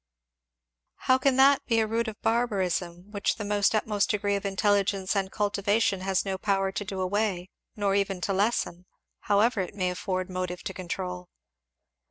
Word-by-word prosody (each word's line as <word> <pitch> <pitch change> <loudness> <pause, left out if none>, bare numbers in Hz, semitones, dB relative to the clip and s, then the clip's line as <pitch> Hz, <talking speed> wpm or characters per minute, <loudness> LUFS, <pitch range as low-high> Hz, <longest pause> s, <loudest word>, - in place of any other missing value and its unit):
"How 260 0 +2
can 265 0 +2
that 270 +1 +5
be 230 -2 +3
a 220 - +3
root 225 +2 -1
of 215 -1 -6
barbarism, 190 -5 -1
which 200 -2 0
the 215 - -5 0.3
utmost 210 -1 +1
degree 205 -1 +1
of 200 0 -2
intelligence 195 0 +1
and 195 -1 -1
cultivation 205 -1 +1
has 190 0 0
no 190 -1 -3
power 195 -2 +1
to 205 - -3
do 195 -1 -5
away, 190 -1 -1 0.2
nor 200 -2 0
even 195 -1 0
to 195 - -1
lessen, 190 -3 0 0.3
however 210 +1 +2
it 185 - -6
may 185 -2 0
afford 185 0 -3
motive 185 -1 -4
to 190 - -4
control? 180 0 -5
200 Hz, 165 wpm, -27 LUFS, 185-210 Hz, 0.3 s, that